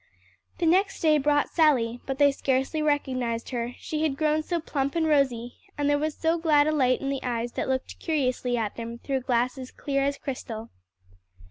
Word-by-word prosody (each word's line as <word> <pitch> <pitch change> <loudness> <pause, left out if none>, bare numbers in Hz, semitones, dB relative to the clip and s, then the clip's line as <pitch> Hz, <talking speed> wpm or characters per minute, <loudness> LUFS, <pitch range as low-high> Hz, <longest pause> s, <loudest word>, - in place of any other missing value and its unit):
The 345 - 0
next 380 +4 +3
day 310 -2 +4
brought 290 +1 +2
Sally, 245 -8 +2
but 270 -1 -2
they 285 0 +5
scarcely 270 +3 0
recognized 255 -6 -1
her, 240 0 -3
she 310 -1 -4
had 300 -4 0
grown 310 0 +2
so 340 +2 -2
plump 280 -3 -2
and 330 -1 +2
rosy, 260 -6 +1 0.2
and 290 -1 0
there 290 0 +3
was 310 0 -2
so 330 +1 +1
glad 300 -3 +4
a 310 - +2
light 255 -4 +2
in 275 - -2
the 275 -1 -2
eyes 240 -1 -2
that - - -3
looked 260 0 -2
curiously 255 -6 0
at 215 -3 -2
them 230 0 -5
through 270 +2 -2
glasses 255 +1 -1
clear 275 -1 -2
as 280 0 0
crystal. 230 -4 -6
275 Hz, 195 wpm, -26 LUFS, 250-305 Hz, 0.2 s, they